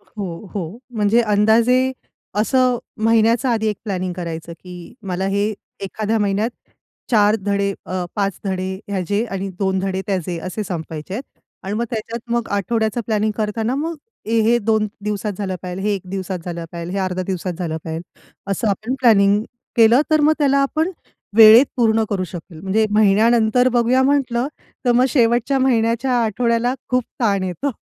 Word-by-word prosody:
हो, 195 -2 -7
हो. 190 +3 -4 0.2
म्हणजे 210 +3 +3
अंदाजे 230 +5 +3 0.5
असं 255 +1 +2 0.3
महिन्याचं 230 +2 +3
आधी 220 -2 +1
एक 210 - -2
प्लॅनिंग 185 -3 -2
करायचं, 170 -2 -6
की 175 +1 -11
मला 185 +1 -1
हे 200 +2 0 0.3
एखाद्या 215 +3 -1
महिन्यात 205 +2 0 0.6
4 210 -1 +4
धडे 200 -1 0
अ, 185 -1 -2
5 200 -2 -1
धडे 190 0 -2
ह्याचे 200 +3 -1
आणि 195 0 -3
2 190 -1 +1
धडे 190 0 -2
त्याचे 180 -3 -2
असे 185 +4 -4
संपायचे 165 -1 -6
आहेत 250 - -3 0.4
आणि 195 +2 -4
मग 235 +2 0
त्याच्यात 230 +1 -5
मग 235 -1 0
आठवड्याचा 220 +3 0
प्लॅनिंग 215 -1 +1
करताना 220 +3 -1
मग 320 +3 -2 0.3
ए, 225 +1 +1
हे 235 +2 +3
2 220 -1 +1 0.2
दिवसात 210 0 -2
झालं 190 -2 -2
पाहिजेल, 180 +2 -5
हे 210 - +2
एक 195 - -5
दिवसात 190 -1 -3
झालं 170 -1 -5
पाहिजेल, 170 +2 -5
हे 200 - 0
0.5 185 0 -2
दिवसात 185 -1 -3
झालं 160 -3 -2
पाहिजेल, 160 +1 -4 0.5
असं 205 +2 0
आपण 220 +6 -1
प्लॅनिंग 205 -4 +5 0.3
केलं 230 +3 +6
तर 310 -1 +4
मग 305 +1 +5
त्याला 280 -1 +3
आपण 315 +5 0 0.5
वेळेत 225 +4 +9
पूर्ण 225 -2 +3
करू 190 -3 -1
शकेल. 165 -1 -9
म्हणजे 210 +4 +1
महिन्यानंतर 220 +4 +4
बघूया 245 +2 +3
म्हटलं, 265 -2 +1 0.4
तर 245 - +4
मग 250 +2 +4
शेवटच्या 240 +2 +2
महिन्याच्या 240 0 +1
आठवड्याला 235 +3 +1
खूप 250 0 +2 0.2
ताण 200 -4 +2
येतो. 245 +10 -2
215 Hz, 165 wpm, -20 LUFS, 190-235 Hz, 0.6 s, वेळेत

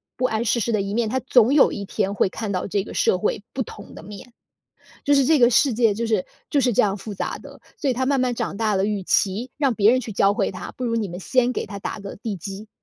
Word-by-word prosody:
不 255 0 0
谙 220 0 -1
世 235 +1 +1
事 235 - -1
的 215 -3 +1
一 200 +1 -4
面， 225 0 0
他 260 +4 0
总 250 -1 +4
有 290 - +6
一 200 - -5
天 200 0 -2
会 190 - +2
看 220 +2 -5
到 190 -2 -2
这 200 0 -1
个 190 - -9
社 - - +2
会 205 +1 -2
不 265 - -3
同 205 -2 -12
的 - - -10
面。 210 +4 -11 0.7
就 290 - +3
是 275 -2 +4
这 315 +3 +4
个 240 -3 +5
世 255 +2 +3
界 225 -2 +3
就 230 +3 -3
是 215 -5 0 0.2
就 285 - +2
是 250 -1 +2
这 210 - +3
样 200 -2 +1
复 210 +1 -7
杂 195 - -4
的， - - -13 0.2
所 290 - -1
以 - - +2
他 260 +2 -1
慢 275 -1 +2
慢 250 -1 +1
长 235 -3 -3
大 215 0 0
了， 190 0 +1
与 205 -2 -2
其 205 +7 0
让 275 -5 +1
别 210 +1 +5
人 255 - +3
去 225 -3 -7
教 195 +1 +3
会 205 -2 0
他， 185 - -7
不 255 - -3
如 230 -1 0
你 215 -4 -1
们 175 +1 -7
先 250 +4 +1
给 - - -3
他 200 - -8
打 200 - -5
个 200 -1 -8
地 215 -2 -5
基。 195 +5 -8
220 Hz, 310 characters per minute, -23 LUFS, 200-250 Hz, 0.7 s, 有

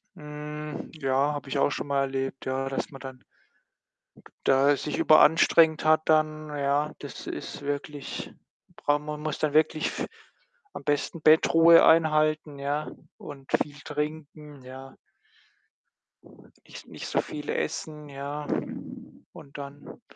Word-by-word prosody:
Hm, 150 0 -7
ja, 140 -1 +1
habe 145 -2 -6
ich 140 - -2
auch 140 - +3
schon 145 - -4
mal 140 -1 +1
erlebt, 135 0 -3
ja, 135 +1 -2
dass 135 - -3
man 135 - -10
dann 130 -1 -10 1.0
d - - -29
da 140 +2 +4
sich 150 - -4
überanstrengt 160 +1 +5
hat 155 0 +4
dann, 155 -1 +1
ja. 145 +1 0
Das - - -9
ist - - -6
wirklich 145 0 -5 0.4
brau 145 0 +1
man 150 0 -6
muss 155 0 -3
dann 150 -2 0
wirklich 155 0 +2
f - - -3 0.7
am - - -8
besten 145 +2 -1
Bettruhe 165 +1 +7
einhalten, 155 -2 +3
ja, 145 +2 -2 0.3
und 135 -2 -11
viel 145 -1 -4
trinken, 150 -1 -6
ja. 130 +1 -11 1.7
Nich - - -11
nicht - - -8
so - - +1
viel 150 -1 -8
essen, 150 -1 -3
ja. 140 +2 -6 0.9
Und 140 0 -12
dann, 140 +8 -10
150 Hz, 135 wpm, -27 LUFS, 140-155 Hz, 1.7 s, Bettruhe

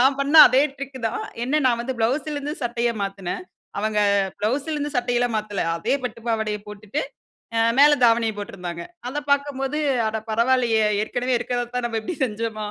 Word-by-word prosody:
நான் 270 +2 +4
பண்ண 280 +3 +2
அதே 260 +2 +4
ட்ரிக் 275 -1 -7
தான். 435 0 -4 0.2
என்ன 300 +4 +1
நான் 235 -2 +2
வந்து 260 0 -4
ப்ளவுஸ்லருந்து 285 +5 -1
சட்டைய 235 0 0
மாத்துனேன். 195 - -4 0.4
அவங்க 215 0 0 0.4
ப்ளவுஸ்லருந்து 290 +7 -1
சட்டை 245 0 0
எல்லாம் 245 -2 0
மாத்தல. 210 -2 -4 0.2
அதே 170 - 0
பட்டு 235 -1 -5
பாவாடைய 220 -2 0
போட்டுட்டு, 210 +7 -4 0.6
அ - - +3 0.2
மேல 295 +1 +8
தாவணிய 230 -1 +3
போட்டிருந்தாங்க. 180 -4 -6 0.3
அத 290 - -5
பார்க்கும்போது, 280 0 0 0.3
"அட 220 0 -2
பரவால்லயே! 235 -1 +2 0.2
ஏற்கனவே 245 +3 -1
இருக்கிறதத்தான், 245 0 -2
நம்ம 225 -1 -2
இப்படி 340 +11 -5
செஞ்சோமா?" 220 -1 -4
240 Hz, 155 wpm, -23 LUFS, 220-275 Hz, 0.6 s, மேல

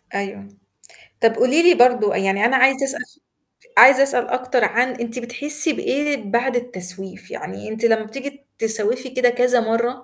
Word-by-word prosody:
أيوة. 200 0 -6 0.8
طب 225 0 +3
قولي 270 +8 +2
لي 355 0 +5
برضو، 245 -6 +3
يعني 195 +2 -1
أنا 260 +3 +3
عايزة 265 +1 +3
أسأل 270 -2 0
س 305 - -27 0.6
عايزة 270 +1 +8
أسأل 260 -3 +1
أكتر 255 -1 -1
عن 245 +4 +1
أنتِ 240 -1 -6
بتحسي 295 +6 0
بإيه 285 +2 -2
بعد 245 +2 0
التسويف؟ 190 -5 -7
يعني 100 - -9
أنتِ 220 +2 -3
لما 225 -1 +2
بتيجي 275 +5 -9 0.2
تسوِّفي 225 +3 -2
كده 255 -1 +1
كذا 245 0 +1
مرة، 230 +1 -1
245 Hz, 160 wpm, -19 LUFS, 220-265 Hz, 0.8 s, عايزة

